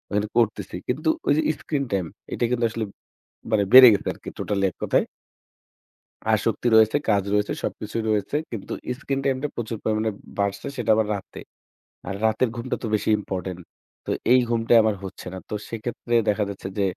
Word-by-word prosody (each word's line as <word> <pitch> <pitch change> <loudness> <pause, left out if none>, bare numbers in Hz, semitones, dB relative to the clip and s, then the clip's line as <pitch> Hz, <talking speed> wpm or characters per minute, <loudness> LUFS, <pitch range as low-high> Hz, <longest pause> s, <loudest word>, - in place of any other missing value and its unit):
আর 105 - +2
করতেছি। 105 -5 +1
কিন্তু 155 +6 0 0.2
ওই - - +5
যে, - - +3 0.2
স্ক্রিন 145 -3 -2
টাইম 95 -3 0 0.3
এটা - - -2
কিন্তু 120 -1 +1
আসলে 115 -1 -3 0.7
মানে 105 -2 +3
বেড়ে 130 -1 +12
গেছে - - -2
আরকি, - - -12
টোট্যালি 100 -1 -1
এককথায়। - - 0 1.3
আসক্তি - - +1
রয়েছে, 110 +4 +6
কাজ 100 -2 +3
রয়েছে, 105 0 +1
সবকিছুই 110 +2 -3
রয়েছে। 105 +6 0
কিন্তু 110 -5 -6 0.3
স্ক্রিন 135 -1 -2
টাইমটা 135 +2 0
প্রচুর 115 -2 -4
পরিমাণে 110 0 0 0.3
বাড়ছে, 100 +2 -1
সেটা 120 -2 -1
আবার 110 -1 +2
রাতে। 100 - -8 0.7
আর, 95 - -3
রাতের 110 +3 +2
ঘুমটা 120 +2 -3
তো - - -2
বেশি 105 - 0
ইম্পরট্যান্ট। 95 -2 -5 0.4
তো, - - -5 0.2
এই 130 - +7
ঘুমটা 115 0 +2
আমার, 110 -1 +2
হচ্ছে 95 -1 -8
না। - - -5
তো - - -4
সেক্ষেত্রে 120 +1 -4
দেখা 105 0 +2
যাচ্ছে 95 -1 -6
যে, 100 - +2
110 Hz, 170 wpm, -24 LUFS, 100-120 Hz, 1.3 s, বেড়ে